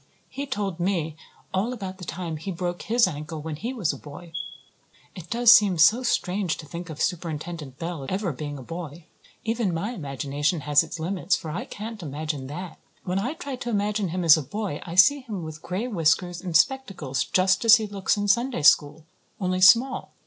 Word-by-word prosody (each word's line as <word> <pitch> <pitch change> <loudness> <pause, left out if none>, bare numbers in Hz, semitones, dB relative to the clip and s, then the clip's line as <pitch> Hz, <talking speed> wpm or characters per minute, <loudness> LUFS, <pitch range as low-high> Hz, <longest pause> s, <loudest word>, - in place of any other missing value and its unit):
He 280 +1 -5
told 200 -8 -3
me 170 -4 -1 0.4
all 195 +6 0
about 190 -5 -7
the 180 - -7
time 165 -1 -4
he 160 +6 -7
broke 175 0 -3
his 230 0 +3
ankle 155 -1 -6
when 155 0 -5
he 235 +10 -4
was 220 - -1
a - - -9
boy. 165 +3 -11 0.8
It 180 -3 -10
does 235 0 +6
seem 200 -6 +6
so 190 +10 +6
strange 190 -7 0
to - - -9
think 170 +3 -7
of 155 -1 -8
Superintendent 160 -4 -3
Bell 165 -5 -5
ever 190 -3 -1
being 145 +1 -6
a 130 - -9
boy. 165 +1 -8 0.4
Even 225 -3 0
my 170 +7 -2
imagination 145 - -2
has 145 0 +4
its - - -6
limits, 180 +2 0
for 160 - -6
I 200 +10 -4
can't 215 -1 -7
imagine 150 -2 -4
that. 170 +4 -7 0.2
When 185 +1 -1
I 250 +10 -2
try 285 -6 -5
to 240 - -5
imagine 205 -2 0
him 180 +2 -3
as 165 -3 +8
a - - -1
boy 170 +2 -4
I 170 - -5
see 235 +11 +6
him 215 -9 -6
with 155 -1 -8
gray 190 +7 -3
whiskers 175 -3 +1
and 175 -4 +2
spectacles, 175 - 0
just 185 +2 +2
as 230 0 +9
he 220 -2 -1
looks 200 0 -1
in 205 0 -1
Sunday 235 - +1
school, 150 0 +4 0.3
only 185 -1 -1
small. 235 +7 +5
180 Hz, 200 wpm, -25 LUFS, 155-210 Hz, 0.8 s, as